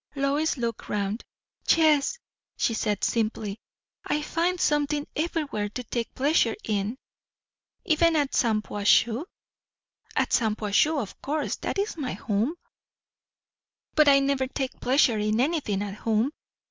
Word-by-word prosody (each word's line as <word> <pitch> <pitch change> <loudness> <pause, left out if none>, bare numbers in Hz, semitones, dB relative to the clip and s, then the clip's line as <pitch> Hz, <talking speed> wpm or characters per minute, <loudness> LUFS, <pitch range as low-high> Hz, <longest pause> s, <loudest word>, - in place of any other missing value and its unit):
Lois 285 +3 +1
looked 235 -3 -4
round. 205 +2 -2 0.5
"Yes," 315 - +4 0.4
she 230 - +1
said 210 -2 -1
simply. 220 -2 -1 0.4
"I 300 - -1
find 345 +4 0
something 295 -1 +1
everywhere 300 -10 -2
to 250 +4 -6
take 235 0 -4
pleasure 290 +5 +2
in." 210 +3 -1 0.9
"Even 330 +1 +3
at 290 -3 +1
Shampuashuh?" 220 +3 +2 0.9
"At - - +1
Shampuashuh, 220 +7 +2
of 215 -7 -6
course. 300 +2 -2
That - - -3
is 400 -2 -1
my 270 -5 -3
home." 225 +9 -1 1.4
"But 305 -1 +5
I 280 -1 +7
never 275 -1 +1
take 265 0 -4
pleasure 250 -4 +3
in 215 +1 +1
anything 260 - 0
at 200 -1 -5
home. 225 +5 0
260 Hz, 125 wpm, -26 LUFS, 215-300 Hz, 1.4 s, I